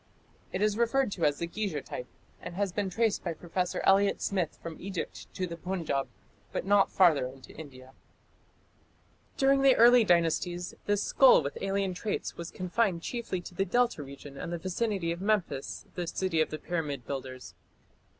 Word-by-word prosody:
It 190 - -1
is 210 +1 +1
referred 235 0 +2
to 170 -5 -1
as 145 -1 +2
the 170 - -2
Giza 185 -3 -3
type, 125 - -6 0.3
and 170 - -7
has 200 0 0
been 200 +1 -1
traced 225 +2 0
by 170 - -2
Professor 180 +2 -2
Elliot 195 +1 +4
Smith 185 -5 -1
from 165 -1 -8
Egypt 190 -2 -6
to 185 - -1
the 170 -1 -6
Punjab, 170 -6 -2 0.4
but - - -3
not 200 0 +4
farther 160 -9 +4
into 130 0 -13
India. 130 -4 -11 1.4
During 275 0 +4
the 270 -2 +6
early 240 +1 +7
dynasties 175 -1 +1
this 205 0 +2
skull 260 - +6
with 140 - -4
alien 195 -1 0
traits 200 +3 -3
was 170 0 -6
confined 185 -1 -1
chiefly 235 -7 -3
to 175 - -10
the 195 - 0
Delta 240 -1 +1
region 140 0 -10
and - - -5
the 170 - -2
vicinity 185 0 -1
of 170 +2 -4
Memphis, 195 -9 -1
the 175 -1 -4
city 165 -2 0
of - - +1
the 155 - -4
pyramid 150 -7 -3
builders. 130 -7 -6
180 Hz, 175 wpm, -29 LUFS, 160-205 Hz, 1.4 s, early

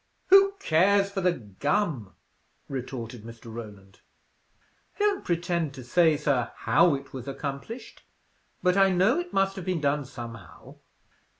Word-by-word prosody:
"Who 390 +1 +7
cares 200 +5 +3
for 195 -1 -2
the 180 -1 +3
gum!" 130 - -2 0.5
retorted 125 -4 -6
Mr. 115 0 -11
Roland. 100 -4 -10 1.0
"I - - -30
don't 410 -1 +1
pretend 170 -4 -1
to 130 - -9
say, 160 +5 +3
sir, 130 -5 0
how 165 0 +3
it 140 0 -9
was 130 -1 -7
accomplished, 140 - -6 0.6
but 180 -1 +3
I 195 0 +5
know 190 - +3
it 350 0 -5
must 195 0 +1
have 185 - -6
been 185 -2 -1
done 145 0 0
somehow. 120 -3 -10
150 Hz, 140 wpm, -27 LUFS, 125-195 Hz, 1.0 s, Who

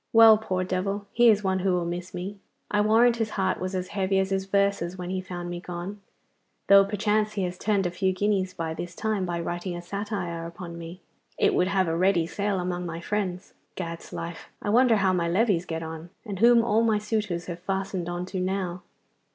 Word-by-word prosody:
Well, 225 -1 +9
poor 185 -4 -1
devil, 195 +2 -2
he 240 0 +6
is 210 -1 +4
one 190 -1 +1
who 185 0 +1
will 175 -1 0
miss 175 +1 -4
me. 190 +3 -6 0.3
I 210 - +3
warrant 230 +3 +4
his 225 -1 -1
heart 190 -1 +1
was 185 +1 -3
as 185 0 -3
heavy 195 -1 0
as 190 0 +1
his 195 0 0
verses 200 -2 +1
when 180 0 -5
he 185 0 -1
found 180 -1 -6
me 175 - -4
gone, 180 +3 -6 0.6
though 200 0 +8
perchance 210 +1 0
he 200 -2 -1
has 180 0 -2
turned 200 0 0
a 175 - 0
few 190 +2 +1
guineas 190 -1 0
by 165 -1 -3
this 175 +1 -6
time 210 -3 -1
by 170 -1 -2
writing 175 +1 -3
a - - -6
satire 180 -4 -4
upon 170 0 -8
me. 170 +2 -9 0.4
It - - +3
would 180 - +2
have 190 -2 +1
a 165 - 0
ready 180 -1 +3
sale 200 +2 -1
among 180 0 -2
my 165 0 -5
friends. 185 0 -3 0.2
Gad's 170 -2 -6
life! 170 0 -6
I - - -3
wonder 245 0 +5
how 190 -3 +2
my 170 -2 0
levees 185 -2 +2
get 165 0 -3
on, 160 +1 -7 0.2
and 200 -4 -5
whom 235 +1 +6
all 225 -1 +2
my 225 -2 +3
suitors 210 -5 -2
have 175 -1 -6
fastened 190 -1 -3
on 175 +1 -3
to 185 0 -4
now. 185 -1 -2
185 Hz, 215 wpm, -26 LUFS, 175-205 Hz, 0.6 s, Well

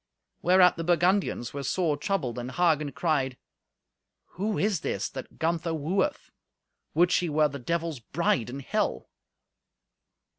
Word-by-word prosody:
Whereat 180 0 +5
the 165 - -3
Burgundians 175 - +1
were 140 - -4
sore 155 +3 0
troubled, 145 - -2
and 125 +1 -5
Hagen 155 -3 +2
cried, 135 -4 0 0.9
"Who 205 +3 -2
is 205 -4 +1
this - - -2
that 130 - -9
Gunther 165 0 0
wooeth? 185 - -1 0.6
Would 175 +2 +4
she 180 -1 +2
were 155 0 +3
the 140 0 -7
Devil's 165 +1 -2
bride 125 -2 0
in 135 +3 -6
Hell!" - - -2
165 Hz, 135 wpm, -27 LUFS, 140-180 Hz, 0.9 s, Whereat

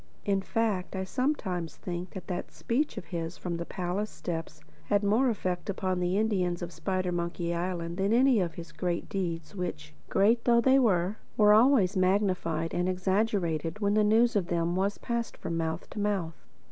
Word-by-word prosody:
In 195 -1 +1
fact 200 -2 -1
I 190 - -1
sometimes 190 - -2
think 175 0 -5
that 190 - -6
that 180 -1 -4
speech 285 +6 -1
of - - -5
his 165 0 -3
from 175 -2 -3
the 170 - -5
palace 190 +3 -2
steps 165 -2 -5 0.3
had 205 0 +2
more 225 +6 +3
effect 185 -4 -2
upon 185 -2 -1
the 180 +2 +1
Indians 185 -5 0
of 170 - -5
Spidermonkey 175 -1 -2
Island 170 -1 -3
than 195 +2 +1
had 230 - +5
any 260 -3 +5
of 170 -4 -1
his 170 -1 -8
great 175 -2 -2
deeds 170 -4 -3
which, 160 -5 -5 0.2
great 225 +5 +3
though 235 -1 +5
they 265 +3 +5
were, 195 -4 +2 0.2
were 210 -1 +7
always 220 -4 +5
magnified 185 -4 +1
and 180 +1 0
exaggerated 185 -3 0
when 205 -1 +1
the 215 0 +4
news 225 +3 +4
of 190 -4 +1
them 170 -1 0
was 195 +2 0
passed 235 -1 -3
from 165 - -4
mouth 160 0 -2
to - - -6
mouth. 195 -6 -2
185 Hz, 185 wpm, -29 LUFS, 170-210 Hz, 0.3 s, were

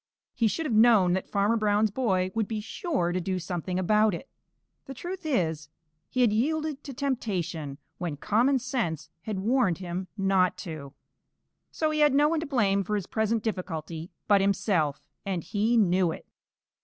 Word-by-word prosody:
He 230 - +2
should 320 +9 -2
have 265 - -1
known 215 -5 +6
that 185 - -2
Farmer 205 +3 +2
Brown's 210 0 +2
boy 190 -6 0
would 220 -2 0
be 220 -2 -3
sure 220 - -2
to 180 +1 -1
do 185 +2 -2
something 180 0 -3
about 210 +2 +3
it. 270 - -9 0.6
The 270 - -7
truth 355 +4 -6
is, 160 - 0 0.4
he 255 - 0
had 230 -4 +4
yielded 300 +4 -1
to 280 - -6
temptation 180 - -2 0.2
when 170 -5 -3
common 240 - +2
sense 175 - -3
had 215 +1 -4
warned 220 -2 +2
him 185 0 -5
not 190 -2 +2
to. 150 -4 -7 0.7
So 310 -1 -1
he 305 - -1
had 295 -2 +5
no 295 +1 +5
one 325 +1 +1
to 320 - -4
blame 200 -8 +2
for 210 +3 -2
his 200 -4 -2
present 220 0 0
difficulty 170 -5 -4 0.2
but 200 -2 +5
himself, 190 -7 +1 0.2
and 185 -4 -2
he 220 +3 +1
knew 185 -4 +3
it. - - -8
205 Hz, 175 wpm, -27 LUFS, 180-240 Hz, 0.7 s, known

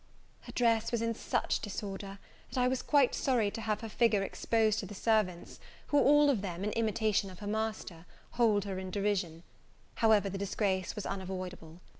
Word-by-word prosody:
Her - - -8
dress 230 -2 +2
was 235 -1 0
in 230 0 0
such - - -1
disorder, 195 -1 -6 0.3
that - - -7
I 250 - +3
was 255 0 0
quite 285 -4 +3
sorry 235 -6 +1
to 225 - -6
have 215 -1 -1
her 225 - -5
figure 220 -2 +2
exposed 220 +1 +1
to 195 - -5
the 205 - -9
servants, 205 -5 0 0.3
who 290 - +4
all 295 +1 +5
of 230 -8 -1
them, 185 -2 -5
in 210 - -1
imitation 220 -2 0
of 185 - -11
her 210 - -9
master, 215 -5 -3 0.2
hold 215 -4 +2
her 190 -2 -4
in 190 0 -6
derision: 190 -4 -1 0.5
however 220 -3 +4
the 195 0 -4
disgrace 195 -1 -1
was 210 - -5
unavoidable. 185 -3 -6
210 Hz, 185 wpm, -31 LUFS, 190-225 Hz, 0.5 s, all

